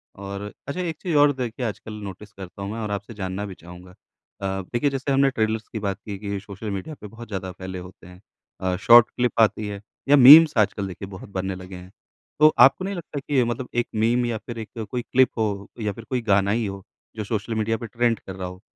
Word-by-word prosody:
और 100 +1 -6 0.2
अच्छा 140 +5 -4
एक 165 -3 -3
चीज़ 175 -4 -2
और 145 0 +6
देखिए 125 -1 -4
आजकल 110 0 -5
नोटिस 100 +1 -9
करता 95 0 -10
हूँ 100 +1 -4
मैं 115 - -5
और 105 -2 -3
आपसे 100 +3 -5
जानना 95 0 -4
भी 100 - -7
चाहूँगा। 90 +2 -13
अ, 95 0 -7
देखिए 120 +4 +2
जैसे 135 0 -3
हमने 135 0 +4
ट्रेलर्स 110 -3 -1
की 110 - -6
बात 100 -2 -2
की 100 -2 -5
कि 100 -1 -4
सोशल 100 +2 -8
मीडिया 120 +11 -5
पर 105 - -7
बहुत 115 +3 -11
ज़्यादा 95 -3 -5
फैले 95 0 -7
होते 90 -1 -12
हैं। 90 +1 -15 0.4
अ, 95 -1 0
शॉर्ट 120 +4 +7
क्लिप 125 -1 -1
आती 110 -1 +2
है 100 -1 -6 0.3
या 145 - +8
मीम्स 150 +4 +10
आजकल 100 -2 +1
देखिए 95 +1 -7
बहुत 95 +1 -10
बनने 95 -1 -3
लगे 90 0 -10
हैं। 90 +1 -11 0.5
तो 155 0 +7
आपको 135 +9 +6
नहीं 200 0 -3
लगता 165 -4 -6
कि 135 -2 +1
मतलब 120 +2 -3
1 120 0 +1
मीम 120 +3 +2
या 115 -2 -1
फ़िर 115 +1 -8
1 110 0 -6
कोई 125 - -1
क्लिप 130 +1 +3
हो 100 -3 -1
या 105 -1 -1
फ़िर 115 - -10
कोई 125 -2 -1
गाना 100 -2 +2
ही 115 +1 0
हो 100 -1 -6 0.3
जो 110 - -3
सोशल 110 +2 -3
मीडिया 110 +1 0
पे 115 -1 -7
ट्रेंड 115 +1 0
कर 95 - -9
रहा 95 -1 -5
हो, 90 +1 -10
105 Hz, 235 wpm, -24 LUFS, 95-120 Hz, 0.5 s, मीम्स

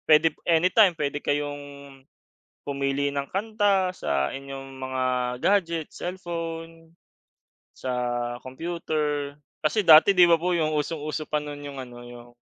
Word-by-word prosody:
Pwede 155 0 +5
anytime, 180 +4 +5
pwede 145 -2 -1
kayong 145 0 -2 1.0
pumili 140 0 -1
ng 140 0 -2
kanta 200 -2 +1
sa 70 - 0
inyong 135 0 -8
mga 130 0 -3 0.4
gadget, 170 -6 +1
cellphone, 165 -2 -6 0.8
sa 130 - -4 0.5
computer. 150 0 -3 0.3
Kasi 155 +8 +2
dati, 160 +5 +8
di 180 -1 +7
ba 170 -1 +5
po 180 +2 0
yung 155 -2 +1
usong-uso 155 0 -3
pa 150 -1 -1
nun 145 -1 -7
yung 140 -1 -7
ano, 125 -1 -11
yung 120 0 -12
155 Hz, 125 wpm, -25 LUFS, 140-170 Hz, 1.0 s, dati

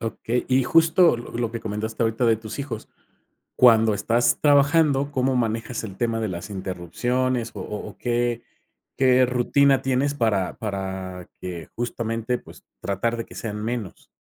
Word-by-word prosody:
Okey. 115 +1 -2
Y, 130 0 +3
justo, 165 -1 +5
lo 120 - -9
lo 115 -1 -2
que 115 - -4
comentaste 110 +1 -3
ahorita 115 +2 +1
de 115 -1 +4
tus 110 +2 -8
hijos, 130 -6 -5 0.7
cuando 115 -3 +6
estás 115 +4 +1
trabajando, 145 -1 +4
¿cómo 130 -1 +1
manejas 115 0 -1
el 100 -3 -8
tema 115 -1 0
de 110 - -1
las 90 +1 -6
interrupciones, 115 +7 -2
o - - -5
o 105 - -6
o - - -14
qué 120 -1 -1 0.5
qué 130 -1 +5
rutina 135 +3 +3
tienes 135 +2 +1
para 110 -9 0
para 95 -3 -5
que, 85 -3 -7
justamente, 115 0 -2
pues, - - -15 0.2
tratar 110 +4 -1
de 115 - -4
que - - -14
sean 105 -2 -5
menos? 115 -4 -5
115 Hz, 160 wpm, -24 LUFS, 105-130 Hz, 0.7 s, cuando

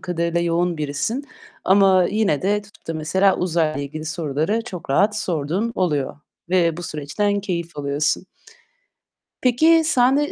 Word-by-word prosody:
kadarıyla 170 -1 -1
yoğun 170 0 0
birisin 155 - -2 0.4
ama 190 -1 +5
yine 205 -8 +1
de 205 +2 +1
tutup 205 - -21
da 165 - -3
mesela, 190 +5 +2
uzayla 165 -4 0
ilgili 155 +3 -6
soruları 160 +7 -1
çok 175 - -8
rahat 205 +8 +3
sorduğun 180 +4 -2
oluyor 150 -8 -1 0.3
ve 170 -3 +2
bu 175 - -6
süreçten 175 +7 -2
keyif 170 -5 -4
alıyorsun. 145 +5 -1 1.2
Peki, 315 +7 +4
sende 280 0 +3
175 Hz, 135 wpm, -21 LUFS, 155-205 Hz, 1.2 s, ama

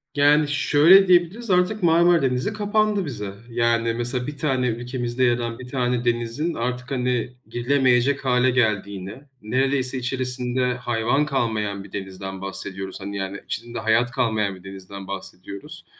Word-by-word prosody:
Yani 145 +1 +4
şöyle 160 +6 +5
diyebiliriz 185 +6 +2
artık: 185 +3 +2
Marmara 170 +1 +5
Denizi 130 +8 0
kapandı 210 -1 +1
bize. 105 -8 -5 0.2
Yani, 115 -1 +1
mesela 120 +2 -3
1 145 -1 -6
tane, 130 -4 0
ülkemizde 120 +1 -2
yer 120 -1 +3
alan 115 -1 -4
1 130 - -9
tane 125 -2 -1
denizin 120 +7 -1
artık 125 +1 -3
hani 125 -2 -1
girilemeyecek 130 +2 +2
hâle 125 0 +3
geldiğini 100 -3 -1 0.2
neredeyse 130 +3 0
içerisinde 125 0 -1
hayvan 120 +3 0
kalmayan 110 -8 -1
bir 100 - -14
denizden 95 -1 -6
bahsediyoruz. 95 0 -6
Hani, 100 +1 -5
yani 95 +1 -4
içinde 120 +1 -5
hayat 115 +2 +2
kalmayan 110 -6 0
bir 90 - -16
denizden 95 0 -9
bahsediyoruz. 95 0 -8
125 Hz, 145 wpm, -23 LUFS, 110-140 Hz, 0.2 s, şöyle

